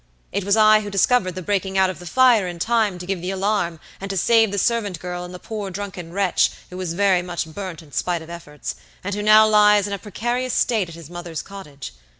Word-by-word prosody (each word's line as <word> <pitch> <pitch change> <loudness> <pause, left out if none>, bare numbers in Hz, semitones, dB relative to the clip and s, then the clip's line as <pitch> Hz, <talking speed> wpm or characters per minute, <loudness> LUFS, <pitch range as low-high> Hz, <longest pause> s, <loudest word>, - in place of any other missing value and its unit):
It 200 +1 -2
was 200 +3 +2
I 215 0 +6
who 205 - -6
discovered 195 -2 +2
the 185 - -6
breaking 195 0 -1
out 190 -1 +3
of 185 - -11
the 175 - -10
fire 245 -4 +4
in 175 -1 -6
time 215 0 +1
to 180 - -8
give 190 -2 -3
the 180 - -4
alarm 190 -4 -1 0.2
and 195 - -6
to 195 - -2
save 225 +2 +4
the 200 - -3
servant 205 -4 0
girl 180 0 -5
and 180 - -8
the 180 - -8
poor 210 +1 -6
drunken 185 -3 -7
wretch, 195 0 +2 0.2
who 180 - -7
was 180 -3 -4
very 195 -2 +3
much 175 -1 -4
burnt 170 0 -7
in 150 - -19
spite 170 +5 -1
of 160 - -14
efforts, 150 -4 -7 0.3
and 200 +2 -3
who 205 - -2
now 215 +1 +7
lies 210 -1 +5
in 200 - -4
a 200 - -3
precarious 240 +5 -2
state 215 -8 +1
at 165 - -10
his 165 -1 -12
mother's 175 -2 -6
cottage. 150 - -10
195 Hz, 240 wpm, -22 LUFS, 175-210 Hz, 0.3 s, now